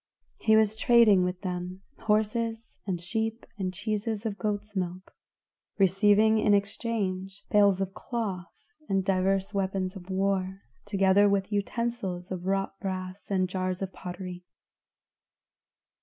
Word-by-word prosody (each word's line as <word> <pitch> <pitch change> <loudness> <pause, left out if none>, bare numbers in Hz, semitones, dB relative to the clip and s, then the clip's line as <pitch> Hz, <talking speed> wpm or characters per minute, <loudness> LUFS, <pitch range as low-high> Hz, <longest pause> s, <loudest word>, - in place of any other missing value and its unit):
He 220 - +4
was 220 -1 +3
trading 220 -5 +5
with 180 0 -2
them, 180 0 -4 0.2
horses 225 +1 -1
and 180 -3 -1
sheep 225 +6 -2
and 185 -1 -1
cheeses 210 +3 -3
of 210 -2 -3
goat's 210 0 -3
milk, 185 0 -4 0.6
receiving 205 +3 +4
in 210 -1 +4
exchange 200 -2 -2
bales 200 -2 +5
of 195 0 -2
cloth 195 -10 -4 0.4
and 195 -1 +1
divers 195 +1 +1
weapons 190 -1 -1
of 185 -1 -10
war, 190 0 -1 0.2
together 200 0 +4
with 200 +1 0
utensils 205 -3 -2
of 185 0 -4
wrought 195 0 -1
brass 185 0 -5
and 185 -2 +1
jars 185 0 -2
of 190 - -5
pottery. 180 0 -7
195 Hz, 125 wpm, -28 LUFS, 185-210 Hz, 0.6 s, trading